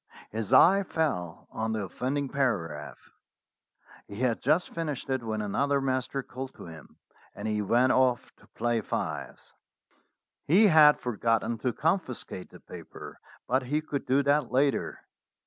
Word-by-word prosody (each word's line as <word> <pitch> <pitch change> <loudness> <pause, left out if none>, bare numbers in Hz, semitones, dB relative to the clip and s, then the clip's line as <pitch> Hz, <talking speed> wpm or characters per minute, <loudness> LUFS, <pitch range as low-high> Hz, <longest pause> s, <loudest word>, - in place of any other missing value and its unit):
His 110 -2 -4
eye 195 +4 +7
fell 120 - -3
on 110 0 -2
the 110 -2 -2
of 95 - -9
fending 140 +2 -2
paragraph. 85 - -2 1.1
He 100 - -9
had 120 0 0
just 155 +7 +1
finished 155 -5 -4
it 130 -1 0
when 110 -2 -3
another 140 +7 0
master 130 0 -2
called 130 +1 -8
to - - -11
him, 80 -3 -13 0.4
and - - -5
he 105 -1 0
went 120 +5 +3
off 130 -2 +1
to - - -22
play 120 0 -1
fives. - - -5 0.9
He 190 +9 +6
had 155 -3 +7
forgotten 115 -1 -1
to 125 +2 0
confiscate 140 - -2
the - - -14
paper, - - -11 0.3
but 130 +2 +2
he 150 +2 +1
could 150 -3 -5
do 135 +2 +3
that 140 -3 +1
later. 135 +2 0
130 Hz, 150 wpm, -28 LUFS, 110-145 Hz, 1.1 s, eye